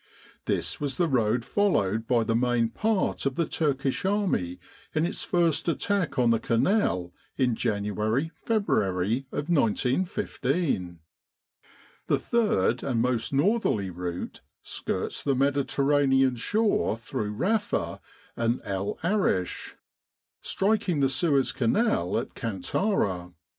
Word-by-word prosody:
This - - -1
was 140 -2 -2
the 175 - +2
road 120 -4 +1
followed 115 - +1
by 120 -3 +3
the 115 0 0
main 120 -1 +2
part 215 - 0
of 135 - -2
the 170 - +1
Turkish 140 -4 -1
army 185 - 0 0.4
in 155 +1 +2
its - - -3
first 170 -3 +1
attack 200 0 -1
on 120 -2 +4
the 115 - +2
Canal 115 - +1 0.2
in 125 -2 +2
January 110 - -1
February 115 - 0
of 145 - -3
1915. 135 - 0 1.1
The - - +3
third 170 - +1
and 125 -4 -1
most 120 -1 0
northerly 140 - +1
route 90 0 -5 0.2
skirts - - -3
the 140 -2 +1
Mediterranean 140 -1 +2
shore 205 - +1
through 105 -2 -4
Rafa 205 - -1 0.3
and 115 +1 0
El 100 0 -3
Arish, 170 - 0 0.7
striking 195 -6 0
the 135 - +3
Suez 140 -1 +2
Canal 130 - +1
at 115 - -4
Kantara. 95 - -1
130 Hz, 115 wpm, -27 LUFS, 110-175 Hz, 1.1 s, on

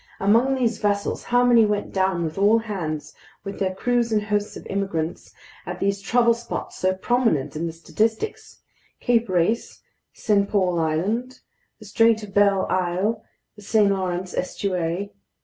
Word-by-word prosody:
Among 230 +7 +3
these 235 -4 0
vessels, 205 -1 -1
how 245 0 +3
many 240 -2 +6
went 210 -1 -1
down 190 -2 +1
with 160 -1 -4
all 205 +3 +4
hands, 160 -9 -4 0.3
with 200 0 -7
their 185 -1 -1
crews 240 +2 0
and 210 -1 +1
hosts 210 0 -2
of - - -11
immigrants, 185 -5 -3 0.4
at 180 +1 -5
these 200 0 0
trouble 235 +3 +3
spots 235 +1 -6
so 185 0 +1
prominent 190 - 0
in 165 +2 -2
the - - -4
statistics: 225 - -3 0.4
Cape 235 -3 +1
Race, 185 +6 0 0.3
St. 200 -2 +1
Paul 185 -4 +1
Island, 205 +11 -1 0.4
the 215 - -14
Strait 225 +1 +3
of 200 -2 -10
Belle 200 -2 +3
Isle, 185 +5 -1 0.3
the 210 - -14
St. 205 -1 +3
Lawrence 185 -1 -2
estuary! 180 0 -2
200 Hz, 155 wpm, -23 LUFS, 185-225 Hz, 0.4 s, many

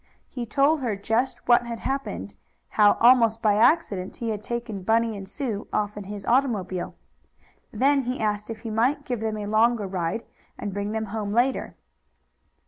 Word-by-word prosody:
He 245 -3 -6
told 280 +6 +2
her 235 -5 -1
just 225 +6 -1
what 240 0 +5
had 230 -1 -5
happened; 275 +1 -3 0.4
how, 210 -1 +5
almost 230 -2 +5
by 215 -3 +3
accident, 220 - +2
he 230 -1 -3
had 210 -1 -4
taken 235 -3 -4
Bunny 225 +3 +1
and 195 -1 -8
Sue 220 -4 -4
off 210 0 -1
in 205 -1 -7
his 200 0 -7
automobile. 215 -8 0 0.8
Then 275 +1 +3
he 250 +2 -2
asked 210 0 -1
if 220 -1 -6
he 225 -2 -5
might 255 +7 +1
give 245 -3 -2
them 220 -1 -2
a 210 - -4
longer 220 +1 +2
ride, 185 +3 -2 0.3
and 205 -2 -5
bring 205 +1 -3
them 220 0 -2
home 210 -2 -3
later. 250 +3 +1
225 Hz, 175 wpm, -25 LUFS, 205-245 Hz, 0.8 s, what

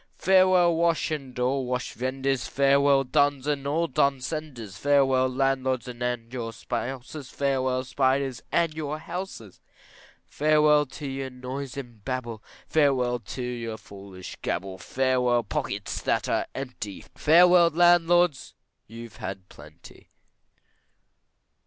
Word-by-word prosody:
Farewell 185 -2 +4
wash 165 -1 +1
and 135 -5 -5
all 130 +2 0
wash 125 0 -3
vendors, 135 0 -2
Farewell 140 0 +3
duns 145 +1 +1
and 145 -2 -1
all 160 +4 +1
dun 140 -2 +1
senders, 130 -8 -6
Farewell 135 +1 +3
landlords 130 -1 0
and 120 -1 -4
your 115 -3 -4
spouses, 130 +5 -5
Farewell 130 -2 0
spiders 135 0 0
and 170 -2 +1
your 155 -1 -4
houses. 165 - -7 0.7
Farewell 150 -1 +3
to 145 +2 -8
your 135 0 -4
noise 130 +1 -7
and 120 -6 -9
babble, 120 -4 -4 0.2
Farewell 130 -5 +2
to 120 +4 -7
your 120 -2 -4
foolish 95 -3 -11
gabble, 95 +1 -3
Farewell 125 +3 +1
pockets - - -4
that - - 0
are - - 0
empty, 125 -7 -6
Farewell 175 +2 +6
landlords, 175 -2 +3 0.3
you've 115 +1 -10
had 95 0 -6
plenty. 75 +3 -15
135 Hz, 120 wpm, -26 LUFS, 125-150 Hz, 0.7 s, Farewell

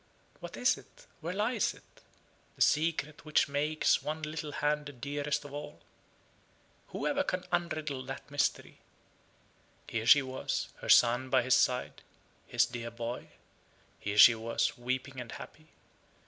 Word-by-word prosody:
What - - -8
is - - +2
it? - - -19
Where 165 +2 -4
lies 215 +1 0
it? - - -22 0.5
the - - -14
secret 155 -1 0
which 155 -1 +2
makes 150 +2 +1
one 155 +1 -4
little 150 -1 -4
hand 150 0 0
the - - -7
dearest 145 +3 -3
of 145 - -10
all? 145 0 -7 1.1
Whoever 285 -1 -1
can 185 -9 -2
unriddle 155 -6 -2
that 135 +2 -7
mystery? 145 -1 -1 1.1
Here 110 0 -3
she 145 - +8
was, 130 0 -3
her - - -8
son 125 +2 +5
by 130 -1 +3
his 130 +1 +2
side, 125 0 +1 0.5
his - - +3
dear 115 -1 -6
boy. 115 +1 -5 0.7
Here 105 0 -3
she 115 - +10
was, 115 +1 -1
weeping 130 +2 -3
and 120 - -8
happy. 155 0 -11
145 Hz, 145 wpm, -31 LUFS, 125-155 Hz, 1.1 s, she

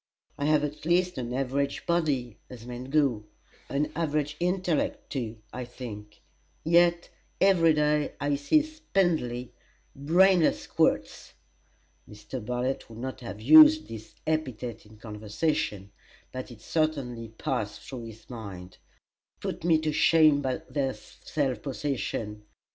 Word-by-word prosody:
I 145 - -3
have 150 -1 +3
at 150 +1 -4
least 180 -1 +1
an 120 -1 -4
average 135 +2 -1
body, 145 -9 0
as 120 -2 -10
men 125 +1 -6
go 135 -6 +1 0.4
an 145 +2 -1
average 150 -2 -1
intellect, 180 -2 -1
too, 115 -5 -3 0.2
I 125 - -4
think; 105 -4 -9 0.4
yet 170 +1 +3 0.3
every 170 -5 +5
day 150 0 +1
I 145 0 0
see 145 - +3
spindly, 175 - -1 0.4
brainless 175 +5 +4
squirts - - 0 0.8
[Mr. 105 +4 -8
Bartlett 125 +3 -2
would 110 - -11
not 130 +2 -5
have 105 -4 -7
used 310 - +8
this 110 -1 -9
epithet 125 -8 -3
in 110 0 -16
conversation, 105 -1 -2 0.4
but 130 0 -6
it 115 -3 -13
certainly 135 -8 -1
passed 125 -8 -3
through 125 -4 -7
his 110 0 -12
mind] 95 -6 -9 0.6
put - - -5
me 165 -2 +4
to 155 -1 0
shame 155 -2 +5
by 130 -2 -2
their 135 -3 -1
self 135 -7 -4
possession. 125 -6 -3
135 Hz, 130 wpm, -28 LUFS, 120-155 Hz, 0.8 s, used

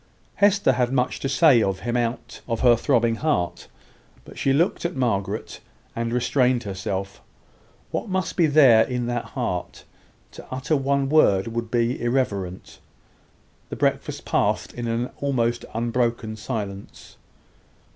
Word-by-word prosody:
Hester 200 -7 +4
had 125 -1 0
much 125 -1 0
to 135 - -2
say 135 -3 +5
of 95 -2 -1
him 120 0 -2
out 120 0 -3
of 115 -2 -2
her 120 -2 +6
throbbing 115 -2 +1
heart; 145 - -1 0.6
but - - -13
she 135 - 0
looked 160 +6 +1
at 170 +1 -2
Margaret, 105 -5 -2 0.4
and 115 0 -2
restrained 125 0 +1
herself. 100 0 -5 0.7
What - - -3
must 185 0 -2
there 145 -9 +5
be 125 - -5
in 120 -1 -1
that 120 0 -2
heart? - - -4 0.5
To - - -12
utter 130 +4 -1
one 140 0 0
word 115 -9 +3
would 115 0 -4
be 120 +1 0
irreverent. 100 -8 -2 0.9
The - - -5
breakfast - - -1
passed - - 0
in 120 -1 -5
an 115 +2 -2
almost 120 -4 -1
unbroken 115 -1 -1
silence. 105 -3 -7
120 Hz, 140 wpm, -23 LUFS, 115-135 Hz, 0.9 s, her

